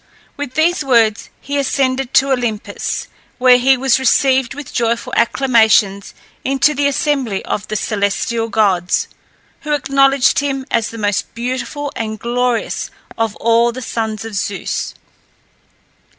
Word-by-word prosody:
With 285 Hz, -3 st, -6 dB
these 320 Hz, +1 st, +2 dB
words 230 Hz, -5 st, +2 dB
he 285 Hz, +1 st, -3 dB
ascended 265 Hz, -1 st, 0 dB
to 275 Hz, +1 st, +4 dB
Olympus, 240 Hz, -5 st, -2 dB, 0.3 s
where 250 Hz, -1 st, +6 dB
he 265 Hz, +1 st, +4 dB
was 265 Hz, 0 st, +2 dB
received 265 Hz, -1 st, +2 dB
with 290 Hz, -2 st, -9 dB
joyful 235 Hz, -1 st, -1 dB
acclamations 220 Hz, -5 st, +2 dB, 0.3 s
into 275 Hz, +2 st, +2 dB
the 285 Hz, -1 st, +1 dB
assembly 275 Hz, -7 st, -1 dB
of 205 Hz, -, -3 dB
the 215 Hz, -, -4 dB
celestial 215 Hz, +2 st, -1 dB
gods, 190 Hz, -5 st, +1 dB, 0.5 s
who 300 Hz, -, -3 dB
acknowledged 275 Hz, -1 st, +3 dB
him 270 Hz, -2 st, -2 dB
as 230 Hz, 0 st, +1 dB
the 230 Hz, -, -9 dB
most 205 Hz, -2 st, -1 dB
beautiful 255 Hz, +4 st, -4 dB
and 220 Hz, -1 st, -4 dB
glorious 240 Hz, +1 st, -1 dB, 0.3 s
of 225 Hz, -2 st, -1 dB
all 235 Hz, +1 st, +2 dB
the 255 Hz, +2 st, -7 dB
sons 220 Hz, -2 st, -3 dB
of 225 Hz, -, -7 dB
Zeus. 200 Hz, 0 st, -3 dB
245 Hz, 135 wpm, -17 LUFS, 225-270 Hz, 0.5 s, where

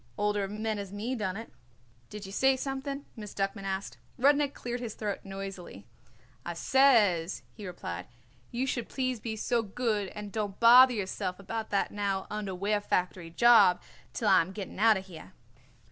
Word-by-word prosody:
Older 205 Hz, -1 st, 0 dB
men 215 Hz, +1 st, -3 dB
as 200 Hz, -2 st, -6 dB
me 215 Hz, +5 st, -3 dB
done 205 Hz, -6 st, -2 dB
it." 225 Hz, -, -9 dB, 0.6 s
"Did 210 Hz, -1 st, -8 dB
you 195 Hz, -, -9 dB
say 265 Hz, +5 st, +3 dB
something?" 275 Hz, +1 st, -4 dB
Miss 210 Hz, -3 st, -9 dB
Duckman 195 Hz, 0 st, -2 dB
asked. 195 Hz, 0 st, -4 dB, 0.2 s
Rudnik 285 Hz, +2 st, +3 dB
cleared 245 Hz, 0 st, -4 dB
his 235 Hz, -3 st, -5 dB
throat 210 Hz, -2 st, -3 dB
noisily. 195 Hz, -, -8 dB, 0.6 s
"I 170 Hz, -, -5 dB
says," 205 Hz, -8 st, +3 dB
he 210 Hz, -3 st, -8 dB
replied, 90 Hz, -, -6 dB, 0.4 s
"you 245 Hz, +3 st, -2 dB
should 245 Hz, -3 st, -3 dB
please 255 Hz, -3 st, -2 dB
be 220 Hz, 0 st, -4 dB
so 235 Hz, +2 st, 0 dB
good 215 Hz, -1 st, -1 dB
and 210 Hz, -1 st, -7 dB
don't 205 Hz, -2 st, -3 dB
bother 250 Hz, +2 st, +8 dB
yourself 190 Hz, -2 st, -3 dB
about 220 Hz, +3 st, -5 dB
that 200 Hz, -, 0 dB
now 200 Hz, -2 st, -2 dB
underwear 205 Hz, 0 st, -1 dB
factory 180 Hz, -3 st, -1 dB
job 230 Hz, -1 st, +6 dB, 0.3 s
till 220 Hz, -, -2 dB
I -, -, +6 dB
am 180 Hz, +3 st, -5 dB
getting 195 Hz, -1 st, -7 dB
out 220 Hz, -1 st, +5 dB
of 190 Hz, -, -7 dB
here." 185 Hz, 0 st, -12 dB
210 Hz, 170 wpm, -29 LUFS, 195-235 Hz, 0.6 s, bother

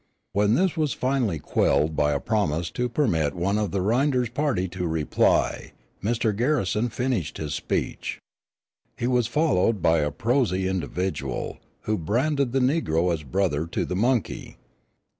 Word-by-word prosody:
When 105 Hz, +2 st, +3 dB
this 185 Hz, +4 st, +2 dB
was 155 Hz, -3 st, 0 dB
finally 125 Hz, -9 st, 0 dB
quelled 75 Hz, +1 st, +1 dB
by 75 Hz, 0 st, +2 dB
a 70 Hz, -, 0 dB
promise 85 Hz, -5 st, -1 dB
to 125 Hz, 0 st, -1 dB
permit 85 Hz, -, +1 dB
one 95 Hz, +4 st, 0 dB
of 105 Hz, -2 st, 0 dB
the 95 Hz, +2 st, -1 dB
Rynders 125 Hz, +3 st, +2 dB
party 125 Hz, -7 st, 0 dB
to 90 Hz, 0 st, -3 dB
reply, 80 Hz, -2 st, +1 dB, 0.3 s
Mr. 110 Hz, 0 st, 0 dB
Garrison 120 Hz, -3 st, +1 dB
finished 120 Hz, -, -2 dB
his 75 Hz, -2 st, -4 dB
speech. -, -, -2 dB, 0.8 s
He -, -, -2 dB
was 125 Hz, -2 st, +2 dB
followed 120 Hz, -, +2 dB
by 80 Hz, -1 st, +3 dB
a 75 Hz, 0 st, +1 dB
prosy 95 Hz, -, 0 dB
individual, 90 Hz, -6 st, -3 dB, 0.2 s
who 110 Hz, -2 st, -1 dB
branded 130 Hz, -, 0 dB
the 135 Hz, -, +1 dB
negro 90 Hz, -, +1 dB
as 80 Hz, -, -3 dB
brother 75 Hz, +2 st, -1 dB
to -, -, -2 dB
the 90 Hz, -, -3 dB
monkey. 120 Hz, +3 st, -1 dB
105 Hz, 150 wpm, -25 LUFS, 85-125 Hz, 0.8 s, When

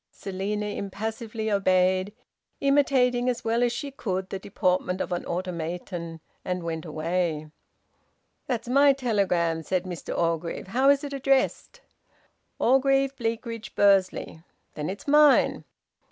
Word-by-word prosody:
Selina 200 Hz, +2 st, -4 dB
impassively 220 Hz, +2 st, -4 dB
obeyed, 185 Hz, 0 st, +2 dB, 0.5 s
imitating 260 Hz, -3 st, +3 dB
as 245 Hz, -, -2 dB
well 230 Hz, +1 st, +1 dB
as 245 Hz, -1 st, +3 dB
she 280 Hz, +4 st, -5 dB
could 190 Hz, -8 st, -4 dB
the 195 Hz, -, -3 dB
deportment 185 Hz, -1 st, -1 dB
of -, -, -3 dB
an 175 Hz, -, -2 dB
automaton; 170 Hz, -1 st, -4 dB, 0.2 s
and 180 Hz, -1 st, -3 dB
went 165 Hz, -1 st, -4 dB
away. 160 Hz, -1 st, -2 dB, 1.0 s
"That's 240 Hz, -2 st, -2 dB
my 280 Hz, +3 st, +5 dB
telegram," 195 Hz, -10 st, 0 dB
said 180 Hz, +2 st, -1 dB
Mr 180 Hz, -3 st, -6 dB
Orgreave. 165 Hz, +2 st, -2 dB
"How 260 Hz, +6 st, +3 dB
is 280 Hz, 0 st, +4 dB
it 285 Hz, -1 st, -5 dB
addressed?" 275 Hz, -, 0 dB, 0.8 s
"Orgreave, 270 Hz, +2 st, +3 dB
Bleakridge, 230 Hz, -2 st, -4 dB
Bursley." 195 Hz, -5 st, +2 dB, 0.3 s
"Then 150 Hz, +2 st, -4 dB
it's 200 Hz, +8 st, -7 dB
mine." 295 Hz, -1 st, +5 dB
200 Hz, 125 wpm, -26 LUFS, 180-250 Hz, 1.0 s, my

